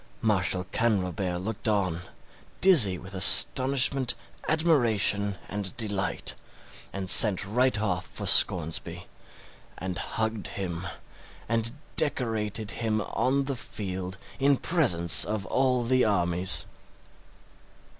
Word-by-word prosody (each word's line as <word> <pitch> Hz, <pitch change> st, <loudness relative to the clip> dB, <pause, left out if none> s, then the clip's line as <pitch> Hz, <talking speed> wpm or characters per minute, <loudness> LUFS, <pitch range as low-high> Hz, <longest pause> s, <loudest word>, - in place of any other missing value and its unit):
Marshal 95 Hz, -4 st, 0 dB
Canrobert 95 Hz, -5 st, -2 dB
looked 110 Hz, +4 st, -6 dB
on, 95 Hz, -5 st, -2 dB, 0.6 s
dizzy 130 Hz, -, +4 dB
with 95 Hz, +2 st, -13 dB
astonishment, 130 Hz, +6 st, +4 dB, 0.3 s
admiration, 115 Hz, -11 st, +1 dB
and 105 Hz, +2 st, -5 dB
delight; 105 Hz, -4 st, -3 dB, 0.6 s
and 95 Hz, -1 st, -7 dB
sent 100 Hz, -1 st, +8 dB
right 125 Hz, +3 st, 0 dB
off 90 Hz, -4 st, -3 dB
for -, -, -8 dB
Scoresby, 80 Hz, -2 st, +1 dB, 0.7 s
and 95 Hz, -1 st, -6 dB
hugged 110 Hz, -2 st, -5 dB
him, 90 Hz, -2 st, -7 dB, 0.6 s
and 115 Hz, 0 st, -2 dB, 0.2 s
decorated 110 Hz, -7 st, -1 dB
him 110 Hz, -1 st, -1 dB
on 130 Hz, +6 st, -2 dB
the 135 Hz, 0 st, -5 dB
field 95 Hz, -5 st, -7 dB, 0.2 s
in 140 Hz, 0 st, +2 dB
presence 95 Hz, -, +2 dB
of 105 Hz, -2 st, -5 dB
all 125 Hz, +2 st, -1 dB
the 130 Hz, +2 st, +1 dB
armies! 90 Hz, -2 st, +1 dB
105 Hz, 105 wpm, -25 LUFS, 95-125 Hz, 0.7 s, sent